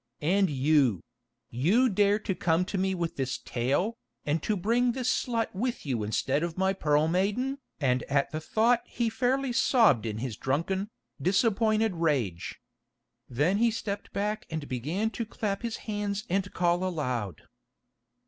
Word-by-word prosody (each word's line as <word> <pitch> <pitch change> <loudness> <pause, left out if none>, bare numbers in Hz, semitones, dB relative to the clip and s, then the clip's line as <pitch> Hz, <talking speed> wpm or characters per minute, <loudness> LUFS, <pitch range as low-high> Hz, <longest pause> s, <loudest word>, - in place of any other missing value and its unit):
And 190 +4 +3
you—you 130 - +1
dare 205 0 +3
to 205 -2 -2
come 170 0 +1
to 195 0 -3
me 190 0 +1
with 170 -2 -3
this 130 -2 -1
tale, 140 - -1 0.3
and 150 +2 0
to 215 - 0
bring 235 +6 +2
this 255 0 0
slut 230 -2 -1
with 235 +2 -3
you 125 -6 -1
instead 130 +7 0
of 170 0 -3
my 190 +1 +2
Pearl 150 -4 +2
Maiden——" 210 +11 0 0.2
and 130 -4 +2
at 140 0 +1
the 155 0 -4
thought 230 +7 +2
he 235 -2 -1
fairly 260 +2 0
sobbed 220 - +4
in 105 -1 -3
his 115 -2 -4
drunken, 190 +9 -1 0.3
disappointed 215 - +2
rage. 135 - -1 0.7
Then 150 +11 +1
he 235 +2 +4
stepped 205 -2 -4
back 210 +1 -2
and 155 -3 -4
began 160 - -2
to 230 - -3
clap 210 -2 -3
his 235 -2 -3
hands 205 -1 -2
and 190 0 0
call 175 0 +1
aloud. 125 - -3
185 Hz, 155 wpm, -28 LUFS, 140-215 Hz, 0.7 s, sobbed